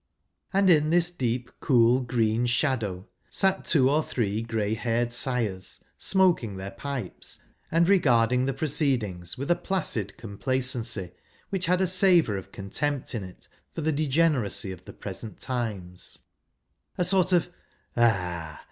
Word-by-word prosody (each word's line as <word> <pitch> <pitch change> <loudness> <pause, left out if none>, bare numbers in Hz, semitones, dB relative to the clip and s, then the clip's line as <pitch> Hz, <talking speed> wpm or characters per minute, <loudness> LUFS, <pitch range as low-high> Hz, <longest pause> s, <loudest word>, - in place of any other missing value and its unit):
And 195 0 +3
in 155 -4 +5
this 175 +1 +3
deep, 125 -5 -2
cool, 120 -1 +4
green 120 -1 +1
shadow 115 - -1 0.2
sate 190 -1 +1
two 135 -5 +4
or 150 +3 +3
three 110 -7 -2
grey 110 -2 -1
haired 120 +1 -1
sires, 115 -7 -2 0.2
smoking 175 - +2
their 95 +1 -6
pipes, 135 -9 -6 0.3
and 170 +1 +3
regarding 125 -9 +3
the 135 - 0
proceedings 130 - -1
with 140 +6 -2
a - - +5
placid 150 - -2
complacency, 115 -3 -2 0.4
which 185 -3 0
had 180 +1 +2
a - - +4
savour 180 - +4
of 95 - -7
contempt 135 +9 -2
in 110 -5 -3
it 90 -1 -12 0.3
for - - -3
the' 160 +1 +1
degeneracy 145 -9 +1
of 90 -1 -10
the - - -10
present 105 +2 -8
times 105 -8 -5 0.4
— - - -45
a 180 - +1
sort 185 0 +2
of 175 -1 +2 0.2
" - - -41
Ah 90 -9 0
125 Hz, 150 wpm, -26 LUFS, 105-155 Hz, 0.4 s, in